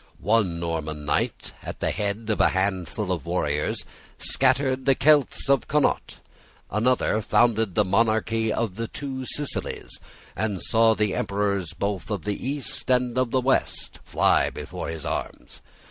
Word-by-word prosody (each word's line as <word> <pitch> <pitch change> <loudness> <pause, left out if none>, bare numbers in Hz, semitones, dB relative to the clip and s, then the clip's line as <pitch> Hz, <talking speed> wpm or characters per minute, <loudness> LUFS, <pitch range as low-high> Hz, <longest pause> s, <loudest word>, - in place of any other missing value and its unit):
One 100 -5 +1
Norman 80 -3 -3
knight, 75 - -1
at - - -7
the - - 0
head 105 +2 -2
of 110 - +1
a - - +5
handful 95 +1 -1
of 85 -7 -3
warriors, - - -1 0.3
scattered 130 0 +2
the 135 - +5
Celts 145 -1 +3
of 135 -4 +3
Connaught. 150 0 +1 0.5
Another 110 0 +2
founded 110 -3 +2
the 105 - +3
monarchy 110 +2 +1
of 105 -3 -2
the 115 0 -2
Two 130 -1 -6
Sicilies, 145 -2 -3 0.4
and 105 -4 -1
saw 115 +2 +3
the 105 -2 0
emperors 100 -4 -1
both 100 -3 -2
of 100 -6 -3
the 105 - -1
East 140 +1 -3
and 125 -1 +2
of 130 -1 +1
the 130 +2 +1
West 135 +1 0
fly - - +3
before - - -6
his 80 -3 -6
arms. - - -5
110 Hz, 150 wpm, -25 LUFS, 100-130 Hz, 0.5 s, a